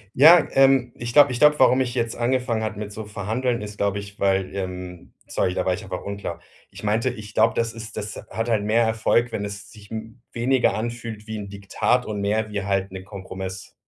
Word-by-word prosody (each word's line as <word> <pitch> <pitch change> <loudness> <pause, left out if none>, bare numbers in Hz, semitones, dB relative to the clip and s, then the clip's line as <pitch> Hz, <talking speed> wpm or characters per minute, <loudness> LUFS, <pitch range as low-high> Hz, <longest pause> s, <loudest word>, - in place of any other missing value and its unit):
Ja, 160 +6 +8
ähm. 135 -3 +4
Ich 120 0 -5
glaube 145 -3 +7
ich 120 - -3
glaube, 150 0 +6
warum 130 0 +5
ich 125 -1 -2
jetzt 115 -1 -1
angefangen 120 -2 0
habe 110 -1 -3
mit 105 -1 -5
so 110 0 -6
Verhandeln, 110 +4 -2
ist, 105 0 -7
glaube 100 0 0
ich, 100 0 -10
weil 95 -1 +1
ähm, 90 -2 -6
sorry, 90 - 0
da - - -1
war 95 - +2
ich 105 - -5
einfach 90 - -6
unklar. 100 0 -5 0.3
Ich - - -12
meinte, 110 +4 +1
ich 110 -3 -8
glaube, 110 0 +3
das 115 -1 0
ist 115 -1 -9
das 105 0 -5
hat 115 +3 -3
halt 105 -3 +2
mehr 110 +3 +3
Erfolg, 115 +1 +2
wenn 100 - -3
es 100 0 -8
sich 105 -2 -15 0.4
weniger 125 +2 +2
anfühlt 115 -1 -5
wie 110 - -4
'n 100 -1 -6
Diktat 100 +5 0
und 105 -2 -4
mehr 105 +2 0
wie 100 -2 -3
halt 100 -1 -1
'ne 95 -1 -7
Kompromiss. 95 -1 -7
110 Hz, 215 wpm, -23 LUFS, 100-120 Hz, 0.4 s, Ja